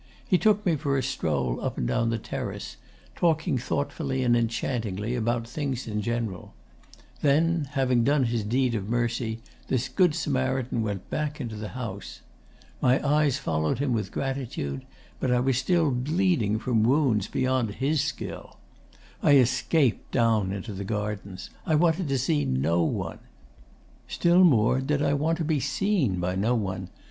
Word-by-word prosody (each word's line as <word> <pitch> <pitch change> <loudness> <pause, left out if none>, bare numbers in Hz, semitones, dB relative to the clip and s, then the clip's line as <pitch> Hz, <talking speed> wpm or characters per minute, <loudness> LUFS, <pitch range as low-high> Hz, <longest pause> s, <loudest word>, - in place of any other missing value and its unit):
He 185 - +3
took 210 -1 +3
me 165 -4 +2
for 140 -1 0
a 130 - 0
stroll 75 - -1
up - - -3
and - - -1
down 120 - +1
the 115 - 0
terrace, 110 - -6 0.4
talking 160 -4 +1
thoughtfully 135 +1 -2
and 120 -1 +3
enchantingly 115 -2 -1
about 115 -1 -1
things 135 -1 -3
in 105 -1 -2
general. 110 - -3 0.7
Then, 155 +2 +2
having 130 -4 +2
done 140 +2 +3
his 115 -2 0
deed 125 +3 +1
of 105 -2 -3
mercy, 115 -1 -1 0.3
this 130 0 0
Good 180 -5 +3
Samaritan 130 -5 -1
went 100 -4 -4
back 150 0 -2
into 120 -5 -5
the 105 0 -5
house. 105 -6 -6 0.6
My 130 +3 +3
eyes 145 -2 +3
followed 80 - -1
him 135 -2 0
with 110 -2 -2
gratitude; 125 - -3 0.3
but - - -1
I 125 0 +3
was 130 0 +1
still 160 +2 +2
bleeding 135 - +1
from 115 0 +1
wounds 120 -4 +2
beyond 130 -5 0
his 140 +2 +1
skill. 155 +1 -5 0.6
I 145 - +5
escaped 130 +1 +2
down 110 -5 +2
into 100 +2 -5
the 100 +1 -5
gardens. 105 -2 -4
I 160 - +1
wanted 165 +2 +2
to 135 -1 +1
see 145 +4 +1
no 75 +7 +1
one. 80 - -2 0.9
Still 175 +2 +4
more 130 -5 +4
did 145 +2 0
I 140 -1 +2
want 155 +3 +1
to 170 - -2
be 155 -2 +1
seen 135 - 0
by 90 +1 -1
no 110 +6 +1
one. 95 -4 -3
125 Hz, 160 wpm, -26 LUFS, 110-145 Hz, 0.9 s, I